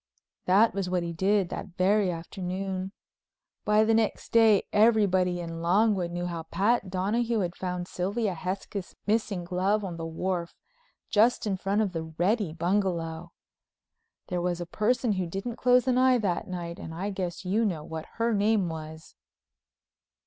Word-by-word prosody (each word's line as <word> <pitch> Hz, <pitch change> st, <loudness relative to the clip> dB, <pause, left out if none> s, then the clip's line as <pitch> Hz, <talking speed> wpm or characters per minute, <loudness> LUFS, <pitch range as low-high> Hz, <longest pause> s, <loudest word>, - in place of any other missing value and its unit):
That 205 Hz, +5 st, +4 dB
was 195 Hz, -2 st, -2 dB
what 180 Hz, -1 st, 0 dB
he 170 Hz, 0 st, -4 dB
did, 190 Hz, +1 st, +1 dB
that 180 Hz, -, -7 dB
very 195 Hz, +1 st, +3 dB
afternoon. 185 Hz, +2 st, -4 dB, 0.7 s
By 210 Hz, +1 st, +4 dB
the 225 Hz, +1 st, +3 dB
next 220 Hz, -1 st, 0 dB
day 225 Hz, -3 st, +5 dB
everybody 200 Hz, -5 st, +3 dB
in 165 Hz, -1 st, -5 dB
Longwood 190 Hz, +1 st, +2 dB
knew 175 Hz, +1 st, -3 dB
how 170 Hz, -2 st, -4 dB
Pat 195 Hz, +6 st, 0 dB
Donahue 215 Hz, +5 st, 0 dB
had 175 Hz, -2 st, -2 dB
found 180 Hz, -1 st, -4 dB
Sylvia 200 Hz, +3 st, -1 dB
Hesketh's 185 Hz, +2 st, -5 dB
missing 210 Hz, -4 st, 0 dB
glove 190 Hz, +4 st, 0 dB
on 175 Hz, -3 st, -5 dB
the 165 Hz, -, -5 dB
wharf 170 Hz, +1 st, -3 dB, 0.6 s
just 225 Hz, +3 st, +3 dB
in 200 Hz, -2 st, 0 dB
front 195 Hz, +3 st, 0 dB
of 205 Hz, -3 st, 0 dB
the 165 Hz, -2 st, -4 dB
Reddy 200 Hz, 0 st, +1 dB
bungalow. 170 Hz, -2 st, -1 dB, 1.0 s
There 180 Hz, -2 st, -2 dB
was 175 Hz, 0 st, -1 dB
a 175 Hz, -, -4 dB
person 220 Hz, +6 st, 0 dB
who 185 Hz, -3 st, -1 dB
didn't 195 Hz, +7 st, -5 dB
close 250 Hz, 0 st, +4 dB
an 255 Hz, -1 st, +3 dB
eye 255 Hz, -1 st, +5 dB
that 195 Hz, -7 st, -1 dB
night, 170 Hz, -2 st, -5 dB
and 160 Hz, -, -7 dB
I 195 Hz, +4 st, -3 dB
guess 185 Hz, -1 st, -4 dB
you 205 Hz, +5 st, +1 dB
know 175 Hz, -8 st, -1 dB
what 160 Hz, 0 st, -7 dB
her 230 Hz, 0 st, +1 dB
name 205 Hz, -3 st, +2 dB
was. 160 Hz, 0 st, -8 dB
190 Hz, 165 wpm, -28 LUFS, 175-210 Hz, 1.0 s, day